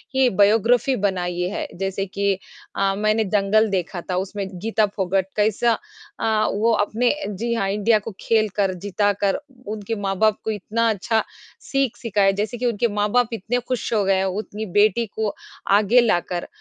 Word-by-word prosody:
ही 265 -2 +4
biography 230 +5 +4
बनाई 180 -2 -3
है। - - -3
जैसे 195 +1 -2
कि 200 +1 0 0.4
अ, 195 0 +1
मैंने 215 +2 +1
दंगल 215 +3 +3
देखा 180 -2 -2
था 180 - 0
उसमें 200 0 -5
गीता 215 +1 +1
फोगाट 190 0 0
कैसा 220 +2 +2 0.4
अ, 220 -1 +1
वो 225 +3 +2
अपने 240 +5 +1 0.2
जी 230 +4 -2
हाँ, 195 -4 0
इंडिया 210 +2 +2
को 225 - -7
खेल 220 -2 +2
कर, 195 -2 +1
जीता 205 +2 0
कर 195 - +2 0.3
उनके 215 +1 -4
माँ-बाप 200 +2 +1
को 220 - -1
इतना 220 +3 -1
अच्छा 220 +2 +1 0.4
सीख 270 -4 -1
सीखा 225 -4 -1
है, 195 0 +5
जैसे 215 +4 -3
कि 250 - -3
उनके 235 0 +1
माँ-बाप 220 +3 +1
इतने 230 +3 -1
खुश 255 -2 -2
हो 210 - +2
गए 195 - +3
है, 190 0 +1
उतनी 210 +2 -4
बेटी 210 +4 +3
को 215 0 -3 0.4
आगे 210 +4 +5
ला 215 -7 +3
कर। 175 0 -5
210 Hz, 175 wpm, -22 LUFS, 195-225 Hz, 0.4 s, है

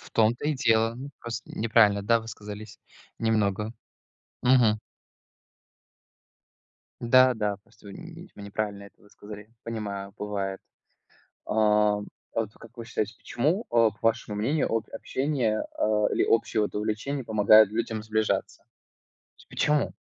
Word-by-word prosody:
В - - -9
том-то 115 +3 +3
и 155 - +1
дело. 115 -3 +2
Мы 135 +4 -8
просто 115 -1 -5
неправильно, 105 -2 +3
да, 115 +3 +2
высказались, 105 -1 -9 0.4
немного. 110 -1 0 0.7
Мгм. 125 -4 +4 2.2
Да, 130 +2 +5
да. 105 -2 -1
Просто 105 - -21
вы 100 - -9
нь 170 - -11
вы 100 - -11
неправильно 100 0 -4
это 100 - -17
высказали. 105 0 -12
Понимаю, 100 -3 -5
бывает. 100 -2 -3 0.9
А, - - -3 0.4
а - - -6 0.3
вот 110 -2 -1
как 115 +1 -16
вы 115 - -7
считаете, 110 -2 -3
почему, 160 - -1
э, 115 -2 +4
к - - -36
вашему 115 -2 0
мнению 130 +9 0
от 115 -1 -1
общения, 130 -6 -1
э, - - +2 0.3
или - - +2
общее, 115 -1 +2
вот, 105 - -3
увлечение 110 +6 -2
помогает 110 -1 +6
людям 110 0 -3
сближаться? 110 0 -1
То - - -33 0.7
есть - - -19
почему? 150 -1 +1
110 Hz, 140 wpm, -27 LUFS, 105-120 Hz, 2.2 s, помогает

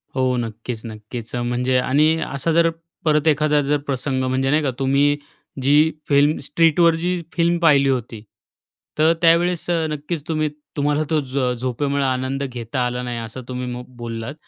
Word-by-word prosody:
हो, 130 -1 +1
नक्कीच-नक्कीच. 115 0 -6
अ, 120 - -1
म्हणजे 125 +1 0
आणि 150 +5 +3
असा 140 +4 -2
जर 165 +1 +4 0.4
परत 150 0 +2
एखादा 150 -1 +3
जर 145 +1 +1
प्रसंग 130 -1 -1
म्हणजे 130 +1 0
नाही 155 +2 +3
का, 135 - 0
तुम्ही 140 +2 +2 0.5
जी 150 +4 +4 0.2
फिल्म, 145 +2 +4
स्ट्रीटवर 165 +3 +3
जी 175 +1 -1
फिल्म 170 0 +2
पाहिली 140 -5 +4
होती, 120 -4 -3 0.7
तर 160 +2 +4
त्यावेळेस 170 +1 +3
अ, 165 -2 +1
नक्कीच 150 +1 -4
तुम्ही 155 -2 0 0.3
तुम्हाला 145 +1 +1
तो 155 -1 +2
झ 130 -1 -1
झोपेमुळं 140 +3 -1
आनंद 130 +1 -1
घेता 125 -1 -4
आला 125 0 -2
नाही, 120 -1 -4
असं 115 +3 -7
तुम्ही 125 0 -4
म 125 - -6 0.2
बोललात, 115 +2 -5
140 Hz, 160 wpm, -21 LUFS, 125-155 Hz, 0.7 s, जर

